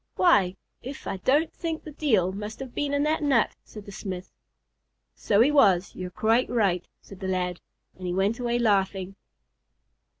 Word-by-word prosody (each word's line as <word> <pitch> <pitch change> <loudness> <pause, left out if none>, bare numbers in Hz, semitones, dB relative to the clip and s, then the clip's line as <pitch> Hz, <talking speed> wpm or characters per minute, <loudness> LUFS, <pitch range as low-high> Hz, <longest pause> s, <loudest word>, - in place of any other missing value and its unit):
"Why! 195 - +4 0.3
if 270 +3 -8
I - - -3
don't 290 - +2
think 325 -2 -4
the 310 - -9
Deil 220 - +1
must 210 +2 -6
have 265 -3 -7
been 290 -1 -1
in 285 0 +1
that 310 +1 +1
nut," 275 -6 +2
said 210 -2 -11
the 200 - -9
smith. 185 -2 -6 0.8
"So 205 0 +2
he 270 +5 +5
was; 200 -10 +4
you're 185 -1 -6
quite 225 +6 +1
right," 195 -7 +1 0.2
said 195 - -13
the 190 - -4
lad, 180 -1 -2 0.3
as - - -19
he 180 -1 -3
went 195 +6 0
away 240 -1 0
laughing. 195 -4 +1
210 Hz, 175 wpm, -26 LUFS, 190-270 Hz, 0.8 s, he